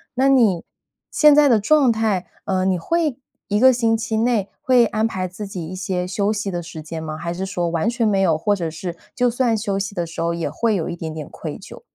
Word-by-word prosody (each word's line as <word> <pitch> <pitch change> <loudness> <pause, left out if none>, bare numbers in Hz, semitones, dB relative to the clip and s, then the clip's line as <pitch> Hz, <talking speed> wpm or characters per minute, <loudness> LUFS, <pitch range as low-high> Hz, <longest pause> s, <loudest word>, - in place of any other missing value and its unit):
那 265 +2 +3
你 225 -10 +3 0.5
现 300 -1 +6
在 295 -1 +6
的 235 -5 +4
状 270 +4 +4
态， 220 -5 0 0.2
呃， 185 -1 0
你 185 -2 +1
会 310 - -1 0.3
一 205 0 +1
个 260 +3 +7
星 230 -2 +2
期 220 0 -2
内， 225 -4 +1
会 250 -2 +4
安 215 0 0
排 185 -5 -2
自 185 +4 -7
己 180 -4 -6
一 185 - -7
些 185 -1 -2
休 200 +2 0
息 210 -1 -2
的 175 -1 -3
时 165 -1 -8
间 160 +1 -6
吗？ 155 -1 -5
还 170 +1 -4
是 185 +2 -4
说 180 -3 -2
完 165 +6 0
全 235 -1 0
没 200 -2 +2
有， 165 -5 +3
或 205 +6 +1
者 170 -4 -3
是 170 +2 -6 0.2
就 250 - +2
算 240 -1 +1
休 205 -2 -2
息 200 +1 -3
的 175 -2 -1
时 165 0 -6
候 170 0 0
也 170 - -2
会 230 -2 0
有 170 - -2
一 - - -4
点 165 -2 -5
点 155 -2 -6
愧 - - -7
疚？ - - -12
200 Hz, 265 characters per minute, -21 LUFS, 175-230 Hz, 0.5 s, 个